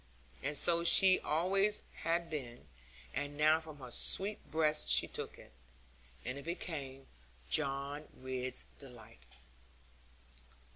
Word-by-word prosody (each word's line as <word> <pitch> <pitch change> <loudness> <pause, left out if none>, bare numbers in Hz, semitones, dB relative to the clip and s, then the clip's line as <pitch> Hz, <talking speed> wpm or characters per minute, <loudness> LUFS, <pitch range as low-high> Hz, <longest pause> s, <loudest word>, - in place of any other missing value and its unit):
And 145 +2 +3
so 170 +2 +5
she 185 +2 +8
always 195 +6 +1
had 170 +1 -1
been, 120 - -7 0.5
and 145 +2 -4
now 155 +1 +4
from 155 -2 -12
her 125 -3 -11
sweet 200 - -1
breast 155 -1 0
she - - +4
took - - -7
it, - - -16 0.7
and 125 +3 -5
it - - -11
became 140 -6 -6 0.5
John 140 0 -2
Ridd's 130 -1 -3
delight. 120 -5 -13
150 Hz, 115 wpm, -34 LUFS, 135-165 Hz, 0.7 s, she